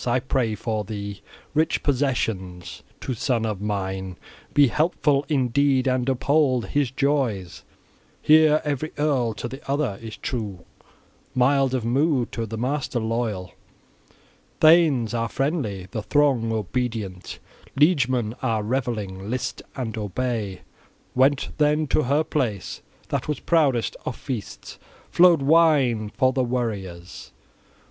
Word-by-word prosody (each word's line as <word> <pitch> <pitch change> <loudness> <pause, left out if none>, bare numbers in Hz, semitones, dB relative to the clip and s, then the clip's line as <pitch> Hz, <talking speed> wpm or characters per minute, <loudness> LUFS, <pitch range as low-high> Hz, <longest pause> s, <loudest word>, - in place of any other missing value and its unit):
I 120 +1 +2
pray 125 -4 -1
for 110 0 -2
thee 100 -1 -6 0.3
rich 155 +2 +1
possessions. 115 -10 -2 0.2
To 130 - -3
son 115 -1 0
of 105 -3 -3
mine 95 -3 -3 0.3
be 145 - +5
helpful 145 0 +1
in 135 -5 +1
deed 135 +1 +2
and 130 0 +1
uphold 130 -4 +1
his 145 -3 +1
joys! 130 - -1 0.6
Here 155 0 +5
every 150 +1 -3
earl 135 -7 +1
to 120 - -4
the 135 +3 -9
other 140 -8 -1
is 110 -1 -8
true, 105 -9 -5 0.7
mild 135 +1 +3
of 120 -3 -2
mood, 130 0 +1
to 115 -1 -3
the 110 +1 -5
master 130 +1 -1
loyal! 110 -5 -2 1.1
Thanes 155 -9 +5
are 115 -1 -1
friendly, 120 - -2
the 110 - -3
throng 130 -3 +2
obedient, 110 -3 -3 0.4
liegemen 130 -8 +3
are 115 -5 0
revelling: 105 -5 -3
list 125 +1 -3
and 120 -4 -4
obey!" 105 -2 -3 0.5
Went 135 +2 +2
then 150 +1 +3
to 155 - +2
her 145 +5 +2
place. 115 -12 -2 0.3
That - - -2
was 150 -3 -2
proudest 140 -9 +1
of 125 - -2
feasts; 120 -7 -7 0.3
flowed 170 -5 +5
wine 140 -8 +3
for 130 +4 +1
the 130 - +1
warriors. 100 -8 -4
125 Hz, 130 wpm, -24 LUFS, 110-140 Hz, 1.1 s, be